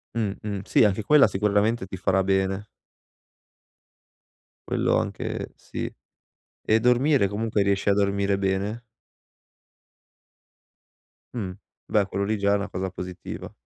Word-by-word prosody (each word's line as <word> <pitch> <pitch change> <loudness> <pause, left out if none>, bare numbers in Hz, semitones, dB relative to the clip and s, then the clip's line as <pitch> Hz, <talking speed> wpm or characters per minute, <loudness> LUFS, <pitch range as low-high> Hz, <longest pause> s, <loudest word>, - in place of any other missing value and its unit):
Mh, 110 -4 0
mh, 100 -2 -3
sì, - - +4
anche 105 0 +2
quella 150 +5 +6
sicuramente 105 +2 +1
ti 95 - -6
farà 95 +1 +2
bene. 95 +1 0 2.0
Quello - - +1
anche - - -3
sì. - - -6 0.7
E 110 +1 +4
dormire, 125 0 +3
comunque, 105 +1 -1
riesci 100 0 +1
a - - +5
dormire 100 0 +1
bene? 100 +4 -1 2.5
Mh, 105 -7 -3 0.4
beh, 105 -2 +2
quello 100 +1 -2
lì 110 +1 0
già 100 0 +1
è - - +4
una 100 0 -4
cosa 95 +1 -3
positiva. 90 -1 -7
100 Hz, 125 wpm, -25 LUFS, 95-110 Hz, 2.5 s, quella